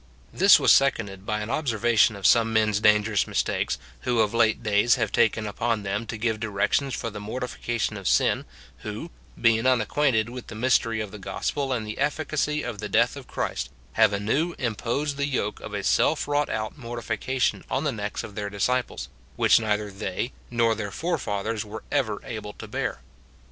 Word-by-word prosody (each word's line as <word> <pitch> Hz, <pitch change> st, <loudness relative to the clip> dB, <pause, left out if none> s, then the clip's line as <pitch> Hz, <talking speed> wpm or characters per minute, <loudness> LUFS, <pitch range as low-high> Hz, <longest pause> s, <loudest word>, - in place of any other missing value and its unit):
This -, -, +7 dB
was -, -, +6 dB
seconded 100 Hz, -8 st, +1 dB
by 105 Hz, 0 st, -1 dB
an 105 Hz, +3 st, -4 dB
observation 120 Hz, -6 st, +2 dB
of 100 Hz, -2 st, -7 dB
some 115 Hz, +1 st, +5 dB
men's 110 Hz, -2 st, +2 dB
dangerous 105 Hz, -1 st, +3 dB
mistakes, -, -, -1 dB, 0.2 s
who 120 Hz, -, +1 dB
of 105 Hz, 0 st, +1 dB
late 115 Hz, -1 st, +2 dB
days 105 Hz, +3 st, +4 dB
have -, -, -1 dB
taken 115 Hz, -2 st, +2 dB
upon 110 Hz, +1 st, -1 dB
them 100 Hz, +3 st, -2 dB
to 115 Hz, -, -4 dB
give 110 Hz, 0 st, -1 dB
directions 110 Hz, +5 st, 0 dB
for 115 Hz, -, -4 dB
the 105 Hz, -, -7 dB
mortification 115 Hz, 0 st, -3 dB
of 100 Hz, -, -5 dB
sin, -, -, +2 dB, 0.3 s
who, -, -, -6 dB, 0.3 s
being 115 Hz, +1 st, +3 dB
unacquainted 125 Hz, -1 st, +2 dB
with 125 Hz, +1 st, -8 dB
the 115 Hz, -, -8 dB
mystery 115 Hz, -1 st, +2 dB
of 105 Hz, -2 st, -5 dB
the 105 Hz, -, -9 dB
gospel 135 Hz, +7 st, -2 dB
and 120 Hz, -4 st, -1 dB
the 105 Hz, -, -6 dB
effi 150 Hz, +3 st, 0 dB
cacy 150 Hz, 0 st, -1 dB
of 115 Hz, -4 st, -5 dB
the 105 Hz, 0 st, -4 dB
death -, -, +3 dB
of -, -, -10 dB
Christ, -, -, -3 dB, 0.2 s
have 110 Hz, -2 st, +5 dB
anew 125 Hz, -, 0 dB
imposed 130 Hz, +4 st, -2 dB
the 140 Hz, 0 st, 0 dB
yoke 105 Hz, -7 st, -2 dB
of -, -, -7 dB
a -, -, -3 dB
self -, -, +2 dB
wrought 145 Hz, 0 st, +1 dB
out 110 Hz, 0 st, -3 dB
mortification 120 Hz, +1 st, -2 dB
on 130 Hz, -, 0 dB
the 150 Hz, -, +1 dB
necks 105 Hz, -3 st, -4 dB
of 105 Hz, -, -8 dB
their 105 Hz, 0 st, -4 dB
disciples, 100 Hz, -, -1 dB, 0.3 s
which -, -, +5 dB
neither 105 Hz, -2 st, -1 dB
they 100 Hz, +4 st, -4 dB, 0.2 s
nor 115 Hz, -1 st, +2 dB
their 105 Hz, -2 st, -4 dB
forefathers 110 Hz, -, -2 dB
were 110 Hz, +1 st, -8 dB
ever 125 Hz, -8 st, 0 dB
able 105 Hz, -2 st, -6 dB
to -, -, -10 dB
bear. -, -, -3 dB
110 Hz, 185 wpm, -25 LUFS, 105-125 Hz, 0.3 s, This